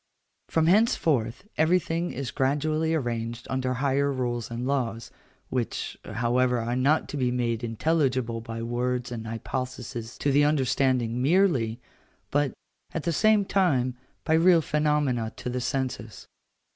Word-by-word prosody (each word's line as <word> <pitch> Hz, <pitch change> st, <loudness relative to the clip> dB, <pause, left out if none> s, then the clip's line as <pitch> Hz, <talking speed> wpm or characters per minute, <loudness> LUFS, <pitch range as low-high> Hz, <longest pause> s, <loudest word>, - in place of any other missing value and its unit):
From 160 Hz, -1 st, +2 dB
henceforth 165 Hz, -, +2 dB
everything 170 Hz, +1 st, +2 dB
is 130 Hz, -3 st, -4 dB
gradually 155 Hz, +5 st, +1 dB
arranged 120 Hz, -4 st, -3 dB
under 130 Hz, -1 st, 0 dB
higher 140 Hz, +1 st, +1 dB
rules 120 Hz, -3 st, -2 dB
and 120 Hz, +1 st, -4 dB
laws, 125 Hz, -4 st, -2 dB, 0.4 s
which, 125 Hz, -3 st, -2 dB
however, 125 Hz, +2 st, +1 dB
are 120 Hz, +1 st, -2 dB
not 140 Hz, +5 st, +2 dB
to 145 Hz, -, -4 dB
be 125 Hz, -2 st, +1 dB
made 120 Hz, -2 st, -1 dB
intelligible 125 Hz, -1 st, 0 dB
by 115 Hz, 0 st, -6 dB
words 120 Hz, +1 st, -2 dB
and 115 Hz, -2 st, -5 dB
hypotheses 120 Hz, 0 st, -5 dB
to 145 Hz, -, 0 dB
the 145 Hz, +2 st, +4 dB
understanding 130 Hz, -4 st, +1 dB
merely, 135 Hz, -, +2 dB, 0.5 s
but, 145 Hz, -2 st, +2 dB, 0.4 s
at 165 Hz, -, -2 dB
the 170 Hz, -, 0 dB
same 215 Hz, +3 st, +4 dB
time, 140 Hz, -11 st, +1 dB, 0.3 s
by 160 Hz, -, +1 dB
real 165 Hz, 0 st, +5 dB
phenomena 150 Hz, -7 st, 0 dB
to 125 Hz, -, -5 dB
the 125 Hz, 0 st, -2 dB
senses. 125 Hz, -4 st, -3 dB
130 Hz, 135 wpm, -26 LUFS, 120-150 Hz, 0.5 s, real